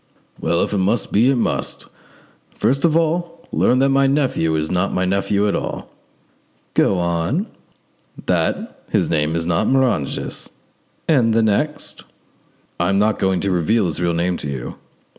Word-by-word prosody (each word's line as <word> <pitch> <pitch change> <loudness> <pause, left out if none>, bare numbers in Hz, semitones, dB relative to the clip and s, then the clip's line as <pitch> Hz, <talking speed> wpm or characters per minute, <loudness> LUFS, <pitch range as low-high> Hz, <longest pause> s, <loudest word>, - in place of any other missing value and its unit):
"Well, 85 +1 +1
if - - -3
it 100 - +1
must 100 +3 0
be, 115 +6 +4
it 135 - +3
must. 120 - -2 0.7
First 135 +4 +1
of 160 -1 +3
all, 170 +1 -1
learn 125 - +3
that 135 +1 +3
my 135 0 +3
nephew 135 - +1
is 80 0 -1
not 90 +2 0
my 90 - 0
nephew 100 +2 +1
at 100 - 0
all." - - -5 0.8
"Go 95 - +3
on." 85 - 0 0.8
"That - - -1
his - - +1
name 75 0 +1
is 85 0 -1
not 85 -1 +1
Moranges." 130 - 0 0.6
"And 120 -8 +3
the 115 - +4
next?" 110 +9 -1 0.8
"I 85 +1 +1
am 100 - +2
not 105 +2 +2
going 95 -1 +1
to 100 - 0
reveal 95 +5 +2
his 85 -1 -2
real 85 -1 +1
name 85 +1 0
to 75 - -4
you." 65 -3 -5
100 Hz, 165 wpm, -20 LUFS, 85-135 Hz, 0.8 s, be